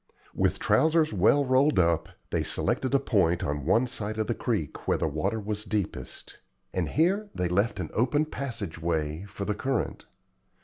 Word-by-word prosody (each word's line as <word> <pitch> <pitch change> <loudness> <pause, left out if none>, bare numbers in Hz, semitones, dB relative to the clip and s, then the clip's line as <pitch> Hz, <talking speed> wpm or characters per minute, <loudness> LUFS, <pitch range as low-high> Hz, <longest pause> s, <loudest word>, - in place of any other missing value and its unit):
With - - +1
trousers 160 -2 +3
well 110 +9 +4
rolled 135 +3 +3
up, 85 -2 +2 0.2
they - - +1
selected 130 +1 0
a - - +5
point 90 -10 +2
on 75 -1 -2
one 115 +7 +4
side 110 -3 -4
of 110 - 0
the 120 - 0
creek 105 - -3
where - - +3
the - - 0
water 80 +9 -1
was 105 0 -3
deepest, 105 -4 -4 0.3
and 90 -5 -1
here 195 +7 +1
they 90 - 0
left 100 +6 +1
an - - -4
open 140 +7 +2
passage 130 - -5
way 80 +1 -1
for 100 0 -6
the 105 - 0
current. 130 +4 -2
105 Hz, 175 wpm, -27 LUFS, 85-135 Hz, 0.3 s, a